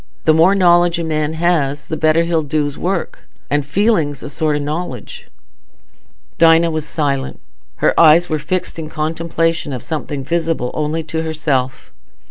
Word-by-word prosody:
The 155 - +4
more 165 +5 +4
knowledge 175 -2 +4
a 170 - -2
man 155 -1 -1
has, 160 -4 0
the 160 - -4
better 155 +1 +2
he'll 165 -1 0
do's 145 -1 -2
work; 180 +2 -3 0.3
and 145 0 +1
feeling's 150 - 0
a - - -6
sort 155 0 0
o' - - -1
knowledge." 145 -5 -5 1.1
Dinah 165 0 +5
was 155 -1 -3
silent; 140 -4 -2 0.5
her - - +4
eyes 165 +2 +6
were 155 - -1
fixed 180 +2 -3
in 155 -1 -6
contemplation 165 0 -1
of 125 -3 -5
something 150 -3 -4
visible 165 -4 -1
only 155 +1 -2
to 160 +1 -3
herself. 150 -5 -2
160 Hz, 155 wpm, -17 LUFS, 145-170 Hz, 1.1 s, eyes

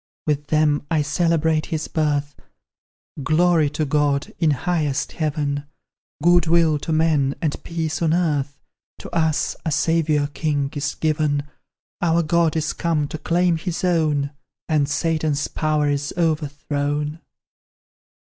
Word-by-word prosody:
With 145 -1 -1
them 150 -2 +2
I 155 -2 +2
celebrate 160 0 +1
His 155 -1 -3
birth 145 -2 -1 0.9
Glory 160 +1 +3
to 155 +1 -2
God, 145 0 0
in 160 - +3
highest 150 0 -1
Heaven, 145 -2 -2 0.6
Good 175 0 +5
will 160 -2 +3
to 160 - -4
men, 155 -4 +2
and 155 -3 -2
peace 160 -2 -3
on 165 -2 +2
earth, 150 -5 0 0.4
To - - -10
us 160 -2 +1
a 160 - -1
Saviour 155 -1 +2
king 145 -1 -2
is 145 +1 -2
given; 150 -2 0 0.6
Our 170 0 +2
God 165 0 +2
is 155 -1 -1
come 160 -4 0
to 155 - -6
claim 175 +1 +2
His 175 +2 -4
own, 155 -5 +1 0.4
And 150 -3 +1
Satan's 155 -1 0
power 155 -1 0
is 145 0 -1
overthrown! 150 -2 -1
155 Hz, 130 wpm, -22 LUFS, 145-165 Hz, 0.9 s, Good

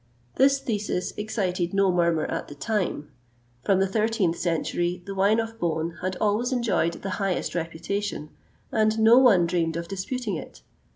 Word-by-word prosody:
This 275 +1 +4
thesis 210 -8 -2
excited 190 -4 -2
no 195 -1 +4
murmur 170 -3 +2
at - - -4
the 145 - -10
time: 185 -4 -2 0.5
from 195 -2 +3
the 195 - +3
13th 210 -3 +1
century 175 +1 -1
the 200 - -5
wine 200 +3 +3
of 225 0 -4
Beaune 165 -1 -2
had 185 0 -2
always 215 +4 +1
enjoyed 230 -9 +1
the 195 - -3
highest 195 -2 -1
reputation, 170 0 -3 0.4
and 215 0 +2
no 225 +3 +7
one 210 -10 +5
dreamed 165 -1 0
of 170 0 -5
disputing 205 +4 -3
it. - - -9
195 Hz, 160 wpm, -25 LUFS, 170-220 Hz, 0.5 s, no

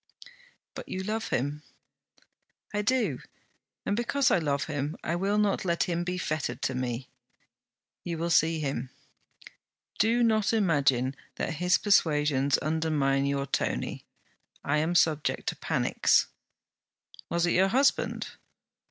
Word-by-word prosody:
'But - - -9
you 190 - -3
love 220 +3 -2
him.' 145 +4 -2 1.1
'I 210 - 0
do: 210 - 0 0.7
and 205 - 0
because 240 +3 +1
I - - +4
love 145 -3 0
him 145 -1 -3
I 170 - -1
will 195 +4 0
not 210 -2 +1
let 170 -2 +1
him 175 -1 -1
be 180 +1 -3
fettered 145 -7 -3
to 130 - 0
me.' 125 0 -3 1.0
'You 170 -1 -4
will 170 +1 -2
see 165 +1 +3
him.' 135 -4 -3 1.1
'Do 230 +3 +3
not 220 -2 +2
imagine 140 - +2 0.2
that 160 - -3
his 180 0 +4
persuasions 150 -8 +2
undermined 150 -3 0
your 140 0 -1
Tony. - - -2 0.6
I 145 +2 +1
am 165 +3 0
subject 155 -3 +1
to - - -5
panics.' - - +1 1.0
'Was 170 0 +1
it 175 - +1
your 190 +2 +4
husband?' 270 +7 +1
160 Hz, 135 wpm, -28 LUFS, 140-195 Hz, 1.1 s, I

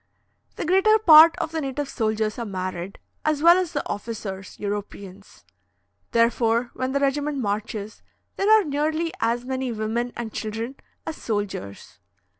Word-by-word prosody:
The - - -4
greater 385 +5 +4
part 330 -5 +8
of 320 - -3
the 320 -1 -2
native 275 +1 -3
soldiers 220 -3 -1
are 235 - -3
married, 185 -1 -5 0.3
as 305 -1 0
well 340 +1 +8
as 365 -3 -3
the 290 - -2
officers 200 -3 -6
(Europeans); 200 -1 -7 0.6
therefore, 230 0 +2
when 255 0 -3
the 280 - +1
regiment 285 +1 0
marches, 210 -2 -4 0.3
there 395 - 0
are 435 -1 +7
nearly 310 +2 -1
as 235 +2 0
many 260 -1 -2
women 230 +2 -2
and 230 -2 -5
children 225 +4 -4 0.3
as 320 - -5
soldiers. 205 - -5
240 Hz, 145 wpm, -24 LUFS, 210-300 Hz, 0.6 s, part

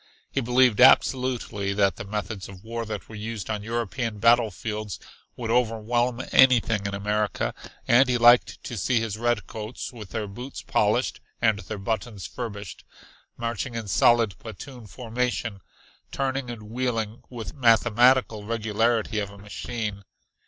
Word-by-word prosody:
He 135 - 0
believed 125 -1 +3
absolutely 125 -6 +3
that 100 -3 +2
the - - -5
methods 105 -1 -5
of 95 0 -12
war 115 0 -4
that 105 -5 -5
were - - -12
used 110 -1 -5
on 105 -1 -2
European 115 0 -3
battlefields 110 -2 +1 0.4
would 115 -2 -3
overwhelm 120 +1 +1
anything 115 -6 +4
in 100 - -3
America, 105 +1 -1 0.3
and 125 +2 +5
he 125 - +2
liked 120 +1 +5
to 120 - -6
see 120 +6 +1
his 110 -2 -3
redcoats 115 0 -3
with 110 -5 -9
their 110 -2 -3
boots 120 +7 -8
polished - - +1 0.2
and 110 -3 +2
their 100 +2 -6
buttons 105 0 -3
furbished, 100 -6 -7 0.5
marching 115 +1 -3
in 115 -2 -4
solid 115 +1 +4
platoon 115 +2 -10
formation, 120 -2 -3 0.5
turning 135 -1 -2
and 115 -3 -7
wheeling 115 -1 -2
with 115 -6 -6
the - - -11
mathematical 120 -1 +4
regularity 110 0 0
of 100 -1 -3
a 100 - -13
machine. 105 0 -5
115 Hz, 145 wpm, -25 LUFS, 105-120 Hz, 0.5 s, and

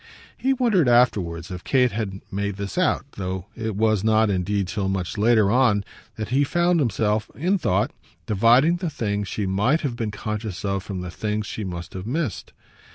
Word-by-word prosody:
He 265 +1 +1
wondered 220 - +3
afterwards 95 -8 +2
if 90 0 -6
Kate 125 -3 +3
had 100 -3 -4
made 100 0 -2
this 100 0 -5
out; 185 -5 +1
though 95 -1 -3
it 110 -2 -3
was 110 -1 +2
not 110 -1 +3
indeed 95 +1 0
till 95 0 -2
much 95 -2 -2
later 110 -1 +4
on 120 -5 +3 0.3
that 110 -2 -5
he 135 +4 +3
found 175 +4 +2
himself, 110 -5 0
in 185 +6 +1
thought, 105 - +1 0.3
dividing 120 - +4
the 175 -1 -2
things 105 -7 -2
she 105 0 -2
might 105 +12 +2
have 135 -6 -2
been 115 -3 -2
conscious 105 -2 -5
of 100 -1 -1
from 95 -1 -5
the 90 -1 -6
things 105 +3 -2
she 110 - -5
must 85 -3 -6
have 95 +2 -6
missed. 145 -2 -3
105 Hz, 185 wpm, -23 LUFS, 100-125 Hz, 0.3 s, later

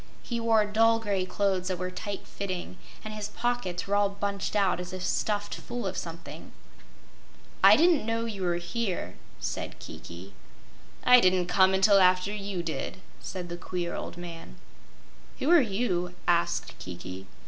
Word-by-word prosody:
He 235 -1 -3
wore 225 -2 +3
dull 225 +2 +4
gray 200 -4 -1
clothes 190 -1 0
that 185 -1 -1
were 185 +1 -3
tight 195 +2 -5
fitting, 185 -2 -5 0.3
and 215 - -5
his 210 -1 -4
pockets 240 -8 -2
were 200 - -2
all 205 0 +3
bunched 200 0 -3
out 195 -4 +2
as 180 0 -6
if 185 -1 -5
stuffed 205 +1 -1
full 240 -2 -5
of 190 -1 -2
something. 165 -2 -7 1.1
"I - - +10
didn't 325 -8 +4
know 230 0 0
you 210 -4 -5
were 175 -2 +1
here," 180 +3 -3 0.2
said - - -4
Kiki. 90 +4 -10 0.7
"I 250 0 +8
didn't 185 -3 +3
come 190 +1 +4
until 195 +1 +6
after 185 +2 +4
you 200 -4 -4
did," 165 +2 -4 0.2
said 180 -2 -6
the 175 0 -5
queer 175 -1 -3
old - - -5
man. 170 - -8 0.8
"Who 285 - +1
are 345 -3 +8
you?" 195 -6 -1
asked 170 -1 +1
Kiki. 90 +1 -8
190 Hz, 160 wpm, -28 LUFS, 175-215 Hz, 1.1 s, I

